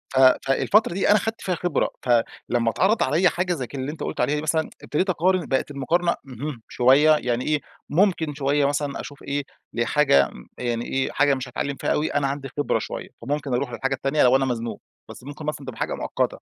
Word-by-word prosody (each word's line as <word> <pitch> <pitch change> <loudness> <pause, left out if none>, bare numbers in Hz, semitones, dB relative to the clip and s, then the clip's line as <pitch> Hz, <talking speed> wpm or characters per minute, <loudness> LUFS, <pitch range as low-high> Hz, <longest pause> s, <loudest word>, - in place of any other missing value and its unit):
ف 130 - +4 0.3
فالفترة 170 - +3
دي 195 - +1
أنا 210 - +7
خدت 225 +4 -4
فيها 180 -2 -1
خبرة، 170 -3 0
فلما 120 -1 +1
اتعرض 205 - +2
عليّا 165 +7 +3
حاجة 180 0 -1
زي 130 -7 -4
ك - - -11
اللي 135 +1 -3
أنت 155 - -7
قُلت - - -3
عليها 140 +4 +2
دي 150 - -2
مثلًا، 155 0 0
ابتديت 185 +6 -1
أقارن، 185 0 +2
بقت 135 +2 0
المقارنة 170 +6 +1
اهم، 135 -1 -6
شوية 135 +5 +5
يعني 125 -2 -1
إيه، 150 -1 +1 0.3
ممكن 165 -3 +2
شوية 140 0 +1
مثلًا 145 0 -1
أشوف 145 - -11
ايه، 140 0 -2 0.3
لحاجة 120 - +3 0.3
يعني 120 -1 -2
إيه، 135 0 -1
حاجة 145 0 +3
مش 130 0 -5
هاتعلم 140 +3 -3
فيها - - -1
أوي 150 - -1
أنا 145 -1 +2
عندي 135 0 -4
خبرة 145 - +1
شوية، - - -6
فممكن 140 +2 -2
أروح 125 0 -2
للحاجة 135 +4 -1
التانية 135 +3 +1
لو 125 +1 +5
أنا 135 0 +3
مزنوق، 120 -2 -3 0.3
بس - - -11
ممكن 145 +3 -8
مثلًا 145 -2 -4
تبقى 125 -3 -7
حاجة - - -1
مؤقتة. - - -2
140 Hz, 205 wpm, -24 LUFS, 130-155 Hz, 0.3 s, أنا